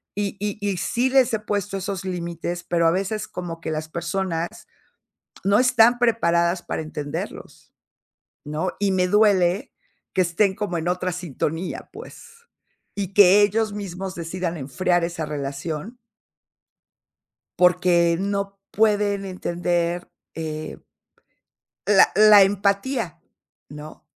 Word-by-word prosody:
Y 205 0 -2
y 205 0 -3
y 195 -2 -1
sí 240 +8 0
les 260 -3 +3
he 220 - +1
puesto 205 -1 -3
esos 195 -1 -4
límites, 175 -1 -4
pero 170 -1 +1
a - - +4
veces 195 +4 -2
como 170 -2 -7
que 160 - -4
las 155 0 -3
personas 170 0 -2 1.0
no 200 +1 +4
están 245 -1 +5
preparadas 175 -7 +2
para - - -4
entenderlos, 150 -2 -7 0.7
¿no? 155 +5 -2
Y 200 -1 +1
me 185 -1 +2
duele 195 -2 +3 0.4
que 185 - +3
estén 190 +3 +1
como 190 -4 -3
en 165 +2 -2
otra 180 0 -1
sintonía, 170 0 -4
pues. - - -11 0.7
Y 200 -1 -3
que 200 0 +7
ellos 210 +1 +1
mismos 190 -2 -5
decidan 175 0 -4
enfriar 175 +5 0
esa 170 -2 -4
relación 150 - -5 1.6
porque 180 -1 +4
no 200 +1 -2
pueden 205 -2 +1
entender, 175 -1 -2 0.3
eh 155 -1 -6 1.1
la 200 -2 +6
la 210 0 +8
empatía, 200 - 0 0.5
¿no? 150 +2 -10
185 Hz, 120 wpm, -23 LUFS, 170-205 Hz, 1.6 s, la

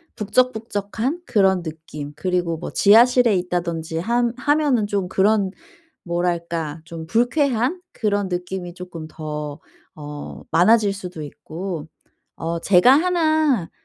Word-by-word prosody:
북적북적한 225 - -1
그런 190 -3 +3
느낌 155 -2 -7
그리고 180 -1 -1
뭐 165 - -6
지하실에 235 +1 +5
있다든지 170 -2 -2
하 240 +5 +1
하면은 285 -6 +2
좀 200 -3 -1
그런 200 0 +2 0.5
뭐랄까 170 -3 -2
좀 165 -1 -8
불쾌한 245 - +1
그런 205 -3 -1
느낌이 180 0 -4
쪼끔 180 -3 -8
더 150 -2 -6 0.4
어 145 -1 -8
많아질 205 +4 +4
수도 180 -5 -7
있고. 165 +3 -6 0.5
어 165 +1 -3
제가 185 +6 +5
1 310 - +2
185 Hz, 235 characters per minute, -22 LUFS, 165-230 Hz, 0.5 s, 지하실에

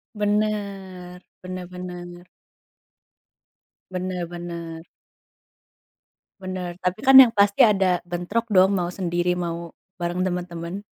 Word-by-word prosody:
Bener 200 -4 -2 0.2
bener 185 -1 -6
bener. 175 -1 -9 1.7
Bener 180 -1 -3
bener. 170 -1 -7 1.6
Benar. 185 -2 -5
Tapi 180 +3 -1
kan 270 +1 +5
yang 255 -3 +10
pasti 200 -1 +4
ada 190 -5 +3
bentrok 175 +6 -2
dong, 190 0 +5
mau 175 -2 -1
sendiri, 175 -1 -1
mau 170 -1 -4 0.3
bareng 175 +1 -2
temen-temen. 175 +1 -5
180 Hz, 100 wpm, -23 LUFS, 175-195 Hz, 1.7 s, yang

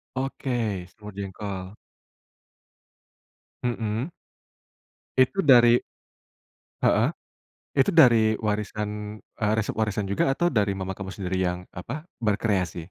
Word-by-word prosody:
Oke 135 0 -3 0.4
semur 105 -1 -11
jengkol. 95 -1 -5 1.9
Mhm. 120 +4 -2 1.1
Itu 150 +8 +3
dari, 120 -3 +7 1.1
heeh, - - +4 0.7
itu 140 +8 +4
dari 120 -9 +6
warisan, 105 0 -3
eee, 105 0 -2
resep 110 - -2
warisan 105 -2 0
juga 100 +7 +1
atau 175 +6 +1
dari 105 -10 +2
mama 95 0 -4
kamu 95 -2 -6
sendiri 95 -1 -3
yang 90 0 -1 0.2
apa 140 - -6 0.2
berkreasi? 100 -5 +1
105 Hz, 100 wpm, -26 LUFS, 100-120 Hz, 1.9 s, dari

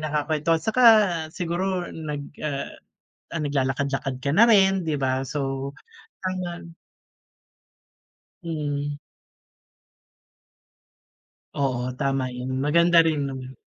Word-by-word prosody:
nakakwentuhan. 155 +1 0
Saka, 235 +3 +1 0.5
siguro 180 +2 -2
nag 150 -3 -5 0.2
ah, 145 -2 -3 0.6
ah, 165 - -1
naglalakad-lakad 135 -1 -1
ka 140 - 0
na 215 +10 +6
rin, 195 -5 +4
di 155 - 0
ba? 130 -1 -1
So, 135 0 -3 0.5
taman 175 -3 -5 1.7
Hmm. 145 -3 -3 2.6
Oo, 130 -2 -1
tama 135 -2 0
yun, 130 +1 -3
maganda 170 +4 +4
rin 160 -3 +2
naman. 130 -1 -7
150 Hz, 90 wpm, -24 LUFS, 135-170 Hz, 2.6 s, na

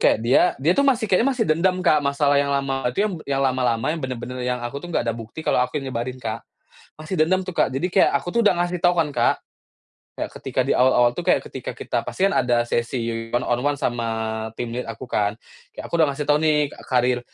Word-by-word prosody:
kayak - - +4
dia 125 - +5
dia 150 +6 +2
tuh 280 +9 +2
masih 250 -4 +2
kayaknya 225 +8 +4
masih 230 - +1
dendam, 180 +2 +2
Kak. 155 -3 +5
Masalah 140 0 +2
yang 140 - -1
lama 135 -1 -1
itu, 125 - -6 0.3
yang 135 0 +1
lama-lama 125 -3 +1
yang 165 - -4
bener-bener 125 -1 -5
yang 125 -1 -1
aku 140 +4 -5
tuh 175 - -9
nggak 140 - 0
ada 115 -1 -1
bukti 115 +8 -9
kalau - - +2
aku 125 +3 -1
yang 135 -1 -6
nyebarin, 125 +2 -3
Kak. 115 -3 -4 0.6
Masih 155 +4 -5
dendam 185 +4 +3
tuh, 185 - -5
Kak. - - +3
Jadi 175 +7 -1
kayak, 195 - +4
aku 140 +5 -4
tuh 235 - +3
udah 185 - +5
ngasih 175 0 -1
tahu 175 0 +4
kan, 160 - +2
Kak. 120 -1 +2 0.8
Kayak - - -3
ketika - - -2
di - - +3
awal-awal 125 -1 +4
tuh, - - -4
kayak - - +3
ketika - - -6
kita - - -3
pasti 195 - +1
kan - - -2
ada 120 -1 +2
sesi 115 -1 -2
one-on-one 125 +4 0
sama 120 -1 -1 0.5
team 120 -1 -4
lead 125 - -3
aku 115 +2 -7
kan. 105 0 0 0.4
Kayak - - -8
aku - - -25
udah 160 - +5
ngasih 145 +1 -4
tahu 145 0 +4
nih, 155 -1 +3
ka - - -13
karir 125 -1 +2
135 Hz, 230 wpm, -22 LUFS, 120-160 Hz, 0.8 s, dia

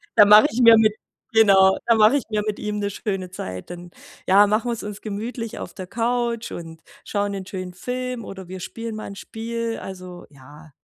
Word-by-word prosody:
da 210 - +8
mache 210 +1 +8
ich 245 +4 -1
mir 230 -1 +9
mit 215 -1 +3 0.4
genau, 195 -3 +6
da 230 - +5
mache 220 +4 +5
ich 275 - -3
mir 215 -1 0
mit 210 - -2
ihm 210 -1 -3
'ne 200 0 -1
schöne 195 -3 -4
Zeit. 90 - -7
Dann, 175 0 -10 0.4
ja, 200 +2 +6
machen 215 +4 0
wir's 230 - -4
uns 205 -1 -7
gemütlich 225 +2 -5
auf - - -7
der 185 -2 -8
Couch 235 +1 -2
und 165 -1 -9 0.2
schauen 205 -1 -1
'nen 195 -1 -5
schönen 185 -1 -6
Film 250 +4 -4
oder 190 -2 -9
wir 185 - -7
spielen 230 +3 -6
mal 215 - -6
'n 200 - -8
Spiel. 230 +2 -5
Also, 180 -2 -9
ja 145 +3 -16
210 Hz, 205 wpm, -22 LUFS, 185-230 Hz, 0.4 s, mir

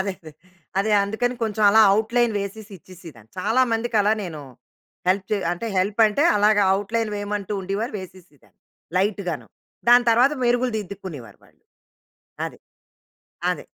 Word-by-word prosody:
అదే, 195 0 -1
అదే. 155 -2 -12 0.5
అదే 215 +2 +1
అందుకని 245 +5 -2
కొంచెం 215 -1 -1
అలా 220 +2 +6
అవుట్‌లైన్ 225 +3 +1
వేసేసి 200 +1 -7
ఇచ్చేసిదాన్ని. 165 - -15
చాలా 220 +7 +2
మందికి 225 0 -1
అలా 205 +1 +3
నేను 165 -5 -6 0.7
హెల్ప్ 190 +1 +1
చే 210 - +2 0.2
అంటే 175 +6 -5
హెల్ప్ 200 +4 0
అంటే 215 +7 0
అలాగ 210 +1 +3 0.2
అవుట్‌లైన్ 215 +3 -2
వేయమంటూ 205 0 -4
ఉండివారు 200 +6 -3
వేసేసేదాన్ని. 185 -6 -15 0.4
లైట్ 200 +2 0
గాను. 160 -4 -4 0.4
దాని 245 0 +7
తర్వాత 245 +5 +4
మెరుగులు 245 +1 +1
దిద్దుకునేవారు 180 - -9
వాళ్ళు. - - -27 0.8
అది. - - -10 0.9
అదే. - - -4
205 Hz, 140 wpm, -23 LUFS, 185-225 Hz, 0.9 s, దాని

